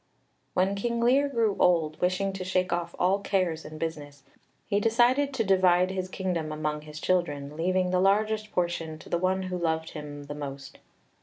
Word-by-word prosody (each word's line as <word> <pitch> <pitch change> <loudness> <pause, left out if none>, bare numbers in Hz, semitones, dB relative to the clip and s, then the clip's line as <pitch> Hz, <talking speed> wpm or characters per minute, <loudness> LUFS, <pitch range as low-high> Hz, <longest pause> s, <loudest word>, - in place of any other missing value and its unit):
When 190 +2 +2
King 235 +4 -2
Lear 265 +5 +3
grew 230 -6 +1
old, 165 -4 +2
wishing 185 +2 +1
to 190 -1 -5
shake 185 -1 0
off 170 0 -3
all 190 +3 +2
cares 185 -5 0
and 155 0 -9
business, 145 -3 -5 0.4
he 200 - +1
decided 245 +6 +3
to 230 - +1
divide 185 -2 +4
his 185 -1 -3
kingdom 175 -5 -2
among 150 0 -2
his 150 0 -9
children, 150 -6 -1
leaving 180 +2 +1
the 185 - +2
largest 215 +2 +2
portion 170 -3 -2
to - - -14
the 170 - 0
one 190 +1 +1
who 185 -1 -3
loved 160 -1 -1
him 145 -2 -7
the 145 +1 -7
most. 140 -2 -7
180 Hz, 180 wpm, -27 LUFS, 155-195 Hz, 0.4 s, divide